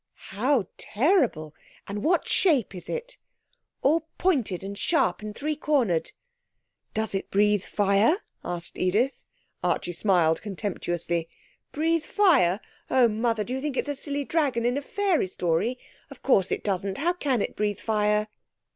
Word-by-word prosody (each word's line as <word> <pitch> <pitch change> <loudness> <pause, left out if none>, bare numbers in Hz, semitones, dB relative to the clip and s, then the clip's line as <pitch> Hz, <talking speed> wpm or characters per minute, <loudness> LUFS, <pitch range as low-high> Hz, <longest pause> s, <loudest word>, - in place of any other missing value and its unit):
'How 235 +3 +1
terrible!... 235 - +1 0.3
And 205 +1 -4
what 345 +1 +2
shape 290 - +2
is 180 - -9
it?' 485 +1 -5 0.6
'All 320 +3 +2
pointed 255 - +1
and 200 +1 -5
sharp, 200 - +1
and 210 0 -6
three 305 +4 -2
cornered.' 260 - +1 0.8
'Does 220 -1 -1
it 195 - -3
breathe 210 0 +3
fire?' 205 - +2 0.3
asked 175 -1 -5
Edith. 215 +9 0 0.4
Archie 175 - 0
smiled 175 -4 +2
contemptuously. 175 -4 -3 0.4
'Breathe 325 +1 +1
fire! 275 - +3 0.3
Oh, 250 -2 +5
Mother! 225 0 0
Do 245 - -5
you 265 - -2
think 285 -2 -3
it's - - 0
a - - 0
silly 285 0 -3
dragon 270 -8 0
in 245 +1 +2
a 285 - -1
fairy 380 - 0
story? 180 +7 0 0.3
Of - - -13
course 195 -8 +3
it - - -1
doesn't. 195 -1 -1
How 340 +5 +1
can 280 -8 0
it - - -5
breathe 210 -1 -1
fire?' 210 -1 +1
220 Hz, 150 wpm, -26 LUFS, 195-290 Hz, 0.8 s, Oh